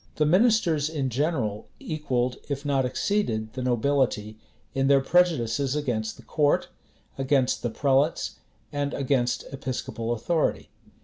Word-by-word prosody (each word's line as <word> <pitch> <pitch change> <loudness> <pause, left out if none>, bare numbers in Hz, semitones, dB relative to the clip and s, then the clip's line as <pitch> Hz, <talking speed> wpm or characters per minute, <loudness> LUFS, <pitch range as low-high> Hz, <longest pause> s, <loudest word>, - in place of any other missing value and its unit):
The 150 - +2
ministers 175 -4 +3
in 140 -5 -2
general 125 -6 -1
equalled, 130 -6 -1
if 140 0 -3
not 135 -2 +2
exceeded, 115 - -1
the 130 - -4
nobility 120 -4 0 0.3
in 135 0 +1
their 140 0 +6
prejudices 140 -5 +2
against 120 -7 -2
the - - -14
court, 145 -2 +1 0.5
against 135 -1 +2
the 120 - -1
prelates, 140 +5 +1 0.3
and 145 -1 -2
against 130 -3 0
episcopal 120 -4 -4
authority. 150 +8 0
135 Hz, 125 wpm, -26 LUFS, 120-150 Hz, 0.5 s, their